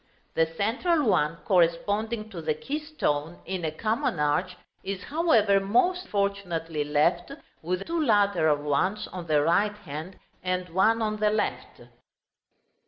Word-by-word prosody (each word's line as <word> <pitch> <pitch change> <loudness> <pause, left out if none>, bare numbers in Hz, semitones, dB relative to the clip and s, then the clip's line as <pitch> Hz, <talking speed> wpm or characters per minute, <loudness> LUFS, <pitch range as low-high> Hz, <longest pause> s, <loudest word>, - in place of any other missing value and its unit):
The 165 0 +2
central 235 - 0
one, 165 - +2
corresponding 205 +5 +1
to 175 -5 -6
the 155 -1 -1
keystone 175 - -3
in 185 -1 -4
a 160 - 0
common 215 0 -1
arch, 180 +5 0 0.3
is, 195 0 -4
however, 230 - +3
most 250 - +1
fortunately 180 -6 -2
left, 160 - +1 0.3
with 180 +3 -2
two 335 -1 -1
lateral 180 - +2
ones 185 +9 0
on 180 -2 -7
the 150 -2 +3
right 205 +6 +2
hand, 160 -1 -8 0.2
and 185 0 -2
one 220 +6 +2
on 215 -1 -1
the 210 0 +2
left. 210 0 -2
190 Hz, 135 wpm, -27 LUFS, 165-215 Hz, 0.3 s, however